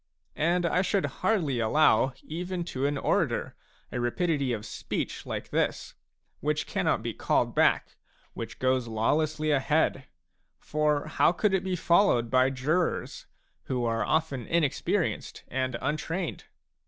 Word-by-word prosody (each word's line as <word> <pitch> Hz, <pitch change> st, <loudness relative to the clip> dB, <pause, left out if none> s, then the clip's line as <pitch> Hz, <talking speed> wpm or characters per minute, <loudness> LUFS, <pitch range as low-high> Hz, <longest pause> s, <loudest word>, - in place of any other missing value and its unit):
And 175 Hz, +3 st, +2 dB
I 180 Hz, +2 st, +2 dB
should 195 Hz, +1 st, +1 dB, 0.2 s
hardly 180 Hz, -, +1 dB
allow 130 Hz, +2 st, +3 dB
even 175 Hz, +2 st, -4 dB
to 135 Hz, +2 st, 0 dB
an 145 Hz, 0 st, -1 dB
orator -, -, 0 dB, 0.4 s
a 125 Hz, -, -3 dB
rapidity 140 Hz, +2 st, 0 dB
of 110 Hz, -2 st, -3 dB
speech 105 Hz, -, -4 dB
like -, -, -5 dB
this, -, -, -1 dB, 0.5 s
which -, -, -1 dB
cannot -, -, 0 dB
be -, -, -3 dB
called -, -, +1 dB
back, -, -, +2 dB, 0.4 s
which -, -, -7 dB
goes 130 Hz, -1 st, +1 dB
lawlessly 155 Hz, +7 st, 0 dB
ahead; 145 Hz, -1 st, +1 dB, 0.5 s
for 150 Hz, -1 st, 0 dB
how 155 Hz, -, +3 dB
could 195 Hz, +3 st, +1 dB
it 190 Hz, -1 st, +1 dB
be 190 Hz, -1 st, -1 dB
followed 170 Hz, -, +3 dB
by 130 Hz, 0 st, +4 dB
jurors, 150 Hz, +7 st, -1 dB, 0.4 s
who 125 Hz, -2 st, -1 dB
are 115 Hz, 0 st, 0 dB
often 150 Hz, -7 st, -1 dB
inexperienced 165 Hz, -5 st, 0 dB
and 130 Hz, -1 st, -1 dB
untrained 160 Hz, +4 st, -2 dB
150 Hz, 135 wpm, -28 LUFS, 130-170 Hz, 0.5 s, by